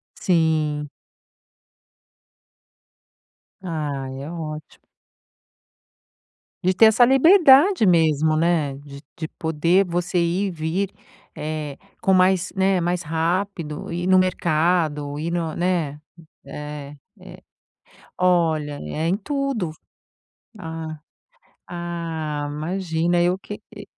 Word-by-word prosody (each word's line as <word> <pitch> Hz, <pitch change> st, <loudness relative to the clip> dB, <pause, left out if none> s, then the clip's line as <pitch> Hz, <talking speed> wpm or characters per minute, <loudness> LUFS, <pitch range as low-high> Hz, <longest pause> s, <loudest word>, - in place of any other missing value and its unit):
Sim. 155 Hz, -4 st, +1 dB, 2.7 s
Ah, 150 Hz, -6 st, -4 dB
é 135 Hz, +3 st, -7 dB
ótimo. 155 Hz, -3 st, -8 dB, 1.8 s
De 185 Hz, +1 st, +3 dB
ter 220 Hz, +4 st, +6 dB
essa 220 Hz, +3 st, +6 dB
liberdade 305 Hz, -, +6 dB
mesmo, 155 Hz, -3 st, +3 dB
né, 160 Hz, -4 st, +1 dB
de 140 Hz, 0 st, -12 dB
de 160 Hz, -2 st, -5 dB
poder 165 Hz, +4 st, +2 dB
você 175 Hz, +1 st, -1 dB
ir 175 Hz, +4 st, +1 dB
e -, -, -3 dB
vir, 170 Hz, +4 st, -2 dB, 0.5 s
eh, 150 Hz, -2 st, -4 dB, 0.2 s
com 190 Hz, -, +3 dB
mais, 185 Hz, 0 st, +3 dB
né, 190 Hz, -1 st, +2 dB
mais 175 Hz, +1 st, -1 dB
rápido 165 Hz, 0 st, -2 dB
ir 175 Hz, +1 st, -3 dB
no 185 Hz, 0 st, +5 dB
mercado 160 Hz, -4 st, +1 dB
e 165 Hz, +2 st, -3 dB
no, 165 Hz, -2 st, -2 dB
né, 170 Hz, -5 st, -1 dB, 0.5 s
eh, 150 Hz, -1 st, -8 dB, 1.2 s
olha, 165 Hz, -5 st, +2 dB
é 155 Hz, -, -3 dB
em 190 Hz, -, +2 dB
tudo, 270 Hz, -, -2 dB
vu 160 Hz, -, -21 dB, 0.8 s
ah, 160 Hz, -2 st, -6 dB, 0.7 s
ah, 165 Hz, -4 st, -4 dB
imagina 170 Hz, +2 st, -1 dB
eu 180 Hz, +1 st, +2 dB
que, 210 Hz, +2 st, -9 dB, 0.2 s
eh 205 Hz, -, -8 dB
170 Hz, 105 wpm, -22 LUFS, 155-185 Hz, 2.7 s, ter